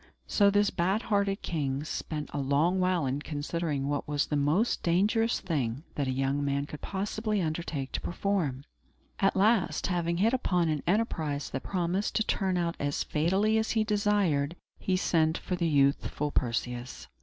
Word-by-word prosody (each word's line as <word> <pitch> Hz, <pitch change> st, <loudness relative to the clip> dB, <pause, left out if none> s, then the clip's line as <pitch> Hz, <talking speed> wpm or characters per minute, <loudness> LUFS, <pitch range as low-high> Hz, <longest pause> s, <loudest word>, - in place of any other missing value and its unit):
So 200 Hz, -1 st, +4 dB
this 205 Hz, 0 st, +3 dB
bad 190 Hz, +6 st, 0 dB
hearted 200 Hz, -2 st, 0 dB
king 140 Hz, -4 st, -2 dB
spent 150 Hz, -1 st, -4 dB
a 145 Hz, -, -2 dB
long 145 Hz, +7 st, +2 dB
while 180 Hz, -4 st, +2 dB
in 135 Hz, +2 st, -1 dB
considering 150 Hz, -1 st, -2 dB
what 145 Hz, 0 st, -2 dB
was 145 Hz, 0 st, +1 dB
the 150 Hz, -, -2 dB
most 150 Hz, +11 st, +2 dB
dangerous 210 Hz, +7 st, +2 dB
thing 140 Hz, -7 st, -2 dB
that 140 Hz, -2 st, -1 dB
a -, -, 0 dB
young 135 Hz, +2 st, 0 dB
man 140 Hz, 0 st, 0 dB
could 150 Hz, 0 st, -9 dB
possibly 210 Hz, +2 st, -2 dB
undertake 155 Hz, -5 st, -3 dB
to -, -, -3 dB
perform. 175 Hz, -8 st, -1 dB, 0.6 s
At 195 Hz, -, +3 dB
last, 200 Hz, -1 st, +2 dB
having 170 Hz, -2 st, 0 dB
hit 220 Hz, +6 st, +3 dB
upon 180 Hz, -9 st, +1 dB
an 150 Hz, -2 st, 0 dB
enterprise 160 Hz, -8 st, 0 dB
that 135 Hz, -, -3 dB
promised 185 Hz, +2 st, -1 dB
to 220 Hz, -, +3 dB
turn 190 Hz, -3 st, 0 dB
out 170 Hz, -1 st, -1 dB
as 145 Hz, 0 st, -1 dB
fatally 195 Hz, +8 st, +2 dB
as 220 Hz, -, -1 dB
he 220 Hz, -1 st, +2 dB
desired, 205 Hz, -8 st, +1 dB, 0.2 s
he 185 Hz, -1 st, 0 dB
sent 160 Hz, -2 st, +2 dB
for 180 Hz, -, -3 dB
the 170 Hz, -1 st, 0 dB
youthful 145 Hz, 0 st, +1 dB
Perseus. 120 Hz, -, -2 dB
170 Hz, 170 wpm, -29 LUFS, 145-195 Hz, 0.6 s, So